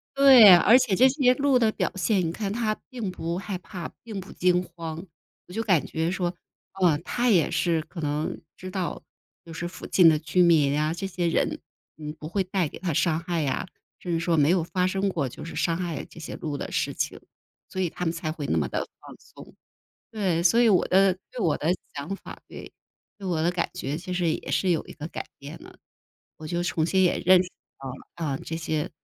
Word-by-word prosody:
对， 255 -9 +9
而 225 +8 +6
且 230 -7 +1
这 260 +5 +6
些 260 -2 +3
鹿 275 -2 +3
的 220 -2 +3
表 185 - -1
现， 190 +2 +1
你 165 - -1
看 200 +2 -3
它 220 -1 0 0.2
并 230 -7 -4
不 170 0 -4
害 195 -1 -5
怕， 180 -2 -7
并 215 -4 -6
不 190 +1 -10
惊 180 0 +2
慌。 165 0 -7 0.4
我 180 - -12
就 225 - -1
感 185 -9 +2
觉 160 +1 -2
说， 180 -1 -2 0.4
哦， 180 -6 +3
它 245 0 0
也 175 -7 +4
是 170 -2 +1
可 165 +1 -9
能 150 +3 -2 0.2
知 185 0 -8
道， 185 -2 -3 0.4
就 165 - -10
是 170 +1 -4
附 175 - -10
近 175 -3 +6
的 155 - +3
居 160 +4 +1
民 155 -5 +4
呀， 155 +1 +1
这 195 - -4
些 175 -2 -2
人， 165 - 0 0.4
嗯， 150 -1 -6
不 155 - -7
会 190 +3 0
带 185 -3 -1
给 - - -10
它 175 -2 -2
伤 160 +2 +1
害 170 -2 -2
呀， 140 +6 -2 0.3
甚 175 - -5
至 165 - +1
说 170 0 +1
没 150 0 +4
有 180 -2 +3
发 180 +2 0
生 195 +1 0
过 145 -8 -2
就 - - -10
是 165 - -8
伤 165 -1 0
害 175 -4 -3
这 165 - -14
些 - - -7
鹿 150 -3 -4
的 - - -6
事 - - 0
情， - - -3 0.5
所 190 - -6
以 180 - +1
它 180 - -6
们 165 - +1
才 165 -2 -4
会 150 -3 -5
那 80 - +1
么 75 - +1
得 - - -2 0.2
放 - - -13
松。 - - -15 0.6
对， 190 -6 0
所 185 +7 +4
以 240 - +5
我 195 -5 +3
的 190 0 +4 0.2
对， 250 -1 -8
我 165 -7 +2
的 155 - -3 0.3
想 145 +8 -4
法， - - -11
对， - - -10 0.5
对 195 - -6
我 165 -3 0
的 175 - +2
感 175 - -1
觉 140 +2 -3
其 180 +3 -7
实 175 -1 0
也 - - -6
是 185 -2 +1
有 165 - 0
一 - - -9
个 155 0 -7
改 - - -6
变 145 +4 -9
的。 - - -14 0.6
我 155 - -10
就 175 +2 -2
重 165 -2 0
新 190 +2 +2
也 180 - +2
认 185 0 +7
识 180 - -9 0.3
到 135 -1 -6
了， 130 - -6 0.4
啊， - - -4
这 160 - -6
些 155 -2 -2
175 Hz, 250 characters per minute, -26 LUFS, 160-195 Hz, 0.6 s, 对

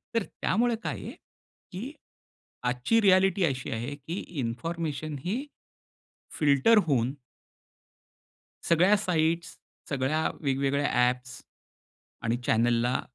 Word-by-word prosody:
तर 230 - +2 0.2
त्यामुळे 235 +3 +2
काय - - -3
आहे - - -6 0.6
की 225 +10 -6 0.7
आजची 125 - +2
रियालिटी 190 -1 +4
अशी 130 -4 -2
आहे, 120 +6 -3
की 160 +7 -6 0.2
इन्फॉर्मेशन 155 +5 -3
ही 240 +10 -2 0.9
फिल्टर 150 +9 +5
होऊन 130 -2 +1 1.6
सगळ्या 180 +5 +5
साइट्स, 165 -3 0 0.3
सगळ्या 140 +3 0
वेगवेगळ्या 140 0 +1 0.2
ॲप 125 0 -4 1.0
आणि 115 +1 0
चॅनलला 120 +2 +2
150 Hz, 95 wpm, -28 LUFS, 130-185 Hz, 1.6 s, फिल्टर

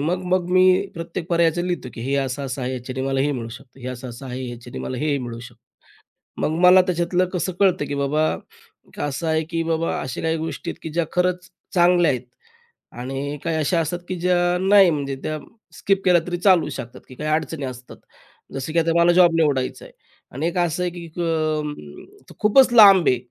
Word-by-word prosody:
मग, 175 +5 -1
मग 185 -1 +2
मी 185 +1 +4
प्रत्येक 165 0 -6
पर्यायाचं 170 0 +2
लिहितो 175 -7 -3
की - - -8
हे 135 +4 -2
असं-असं 135 -1 -3
आहे, 125 - -2
याच्याने 130 +1 -5
मला 135 0 0
हे 145 +2 +1
मिळू 115 -4 -5
शकतं. 125 +3 -13
हे 125 - -8
असं-असं 125 +1 -8
आहे, 130 0 -5
याच्याने 120 0 -9
मला 130 - -5
हे 150 0 0
मिळू 120 -2 -6
शकतं. 120 -1 -13 0.8
मग 160 +1 0
मला 180 +1 +7
त्याच्यातलं 180 0 0
कसं, 185 0 -2
कळतं 190 -6 +3
की 145 - -4
बाबा 140 +2 0 0.8
असं 145 +3 -3
आहे 160 0 +1
की 165 -1 -1
बाबा 165 0 -1
अशा 130 - -5
काही 160 0 0
गोष्टी 160 +1 -5
आहेत - - -9
की 160 - -6
ज्या 170 0 0
खरंच 180 0 0 0.3
चांगल्या 175 -2 +4
आहेत 125 -2 -2 0.8
आणि 135 +3 -4
काही 165 -1 -1
अशा 160 +2 +1
असतात 165 +2 -2
की 185 - -2
ज्या 180 0 +2 0.2
नाही 195 -1 +6
म्हणजे 140 -3 -2
त्या 155 0 -3 0.4
स्किप 195 -1 0
केल्या 180 -2 +5
तरी 175 0 -2
चालू 180 -4 +4
शकतात 120 -4 -8
की 130 - -12
काही 150 +4 -4
अडचणी 155 -1 -1
असतात. 125 -1 -9 0.6
जसं 135 +3 -4
की 170 - +1
आता 165 0 +2
मला 170 +1 +5
जॉब 175 -1 +5
निवडायचा 140 -5 0
आहे - - -14 0.4
आणि 145 +5 -2
1 180 - -3
असं 175 0 0
आहे 180 - 0
की 170 -1 -8 0.2
अं, 155 -2 -1 0.7
खूपच 245 +4 +5
लांब 200 -6 +8
आहे 125 - +4
160 Hz, 200 wpm, -22 LUFS, 135-180 Hz, 0.8 s, लांब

